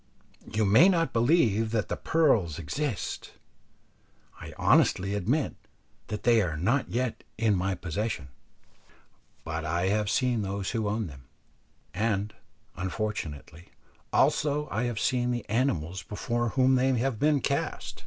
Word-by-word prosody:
You 110 0 +1
may 110 - +6
not 165 -3 +1
believe 115 - +3
that 110 -2 0
the - - -2
pearls 115 - +2
exist; 115 - -4 1.1
I - - -8
honestly 95 +2 +3
admit 120 - 0 0.5
that 105 - -5
they 115 -1 +5
are 85 -6 -2
not 120 - +1
yet 120 -2 -2
in 110 -1 +2
my 95 +1 0
possession, 90 -4 -3 1.1
but 80 0 -4
I 85 +4 0
have 105 0 +1
seen 125 -2 +1
those 100 -1 -3
who 110 -3 -1
own 110 +1 -1
them, 65 -5 -11 0.7
and, 105 0 -1 0.4
unfortunately, 90 -4 -5 0.4
also 150 0 +2
I 110 +4 0
have 120 -3 -2
seen 125 -1 +1
the 120 -1 -3
animals 105 - -1
before 120 +3 -2
whom 130 +2 +3
they 130 +1 +2
have 120 -2 -1
been 150 -1 +3
cast. - - -2
110 Hz, 135 wpm, -28 LUFS, 95-125 Hz, 1.1 s, may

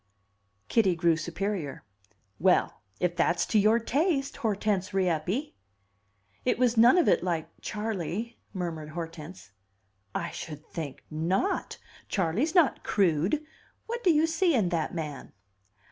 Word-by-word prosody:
Kitty 195 -6 +3
grew 170 -1 +3
superior. 170 -1 -3 0.6
"Well, - - +2 0.2
if 175 -1 0
that's 170 0 +2
to 215 - +2
your 215 +3 +5
taste, 280 - 0
Hortense 205 -3 -1
Rieppe!" 185 - 0 0.9
"It 250 - +1
was 245 -1 +3
none 235 +8 +7
of 350 - +4
it - - +4
like 170 -3 -1
Charley," 215 +1 -3
murmured 165 -5 -4
Hortense. 165 - -8 0.6
"I 170 - -2
should 150 -1 -8
think 150 -6 -6
not! 180 - -1 0.3
Charley's 210 - 0
not 340 -6 +4
crude. 190 - +1 0.4
What 475 +1 -4
do 360 - +5
you 310 0 +4
see 330 0 +2
in 205 -7 +2
that 165 -3 -1
man?" 150 -4 -5
190 Hz, 130 wpm, -28 LUFS, 165-240 Hz, 0.9 s, none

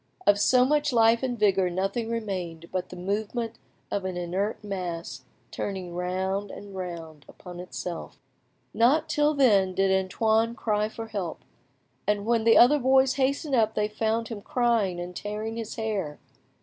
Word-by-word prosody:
Of 205 0 +5
so 250 +4 +5
much 295 +1 +2
life 230 -1 +4
and 250 -2 -2
vigour 195 -3 +3
nothing 195 +6 -2
remained 185 -7 -4
but 185 -1 -3
the - - -9
movement 215 +5 -3 0.3
of 200 - -1
an 185 -1 -3
inert 185 +5 -2
mass 170 -9 -5 0.3
turning 185 -3 -4
round 190 +3 -2
and 200 0 -10
round 165 -5 -7
upon 180 -1 -10
itself. 180 -1 -6 0.6
Not 255 +7 +3
till 295 +1 +2
then 200 -9 +4
did 195 0 +2
Antoine 220 +4 +1
cry 215 -1 0
for 225 0 -8
help, 195 -6 -4 0.7
and 205 0 +1
when 230 -1 +1
the 230 - +6
other 285 +5 +7
boys 265 0 +4
hastened 275 +2 0
up 220 -3 +3
they 210 0 +1
found 220 +1 -1
him 220 -3 -6
crying 230 -7 +1
and 175 +1 -6
tearing 215 +3 -4
his 225 -2 -5
hair. 205 -9 -3
210 Hz, 160 wpm, -27 LUFS, 185-230 Hz, 0.7 s, other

